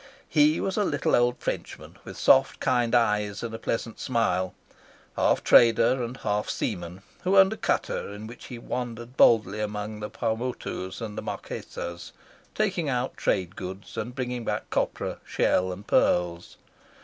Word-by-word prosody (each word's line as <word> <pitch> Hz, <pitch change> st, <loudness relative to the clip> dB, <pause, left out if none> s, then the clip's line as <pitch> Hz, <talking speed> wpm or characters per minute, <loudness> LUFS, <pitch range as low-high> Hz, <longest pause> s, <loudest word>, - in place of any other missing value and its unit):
He 150 Hz, +1 st, +4 dB
was 190 Hz, -, -2 dB
a 210 Hz, -, +3 dB
little 145 Hz, -7 st, +1 dB
old 120 Hz, 0 st, +2 dB
Frenchman, -, -, -5 dB
with -, -, -9 dB
soft -, -, +4 dB
kind 120 Hz, -1 st, +2 dB
eyes 105 Hz, -3 st, +1 dB
and 115 Hz, -1 st, -4 dB
a 115 Hz, -, -5 dB
pleasant 115 Hz, -1 st, -3 dB
smile, 95 Hz, -7 st, 0 dB, 0.6 s
half -, -, +2 dB
trader 120 Hz, +2 st, +5 dB
and 120 Hz, +2 st, -5 dB
half 105 Hz, -3 st, -1 dB
seaman, 90 Hz, +2 st, -4 dB, 0.2 s
who 190 Hz, +2 st, +3 dB
owned 190 Hz, +2 st, +7 dB
a -, -, -8 dB
cutter -, -, -1 dB
in 105 Hz, +1 st, -8 dB
which 120 Hz, +2 st, -10 dB
he 125 Hz, -, -7 dB
wandered 120 Hz, 0 st, -5 dB
boldly 110 Hz, -5 st, +4 dB
among 105 Hz, 0 st, -4 dB
the 105 Hz, 0 st, -5 dB
Paumotus 115 Hz, -3 st, -3 dB
and 110 Hz, -2 st, -5 dB
the -, -, -4 dB
Marquesas, 85 Hz, 0 st, -6 dB, 0.4 s
taking 185 Hz, -8 st, 0 dB
out 125 Hz, 0 st, -1 dB
trade 95 Hz, -1 st, -1 dB
goods 95 Hz, +2 st, -7 dB
and 120 Hz, +3 st, -4 dB
bringing 125 Hz, -2 st, -3 dB
back -, -, -3 dB
copra, -, -, -1 dB
shell, 95 Hz, 0 st, +1 dB
and 95 Hz, +3 st, -8 dB
pearls. 85 Hz, -1 st, +1 dB
115 Hz, 160 wpm, -26 LUFS, 105-125 Hz, 0.6 s, owned